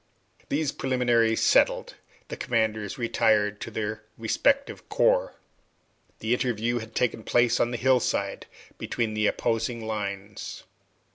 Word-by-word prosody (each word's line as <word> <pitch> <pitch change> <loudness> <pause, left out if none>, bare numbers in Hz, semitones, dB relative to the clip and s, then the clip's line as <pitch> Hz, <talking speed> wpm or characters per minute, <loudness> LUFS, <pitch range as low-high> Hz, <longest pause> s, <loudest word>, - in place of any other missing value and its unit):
These 150 -1 0
preliminaries 120 -3 +1
settled, - - +3 0.4
the - - -4
commanders 110 -3 -1
retired 105 -3 +1
to - - -5
their 110 -1 -3 0.2
respective 275 - 0
corps. - - +2 0.9
The 110 +2 +1
interview 120 -1 0
had 110 0 -10
taken 120 -2 0
place 120 +2 +2
on 120 - +2
the 120 - -3
hillside 120 -6 +1 0.3
between 115 -3 -2
the 105 0 +1
opposing 115 0 -1
lines. 100 -1 -5
115 Hz, 120 wpm, -26 LUFS, 110-125 Hz, 0.9 s, settled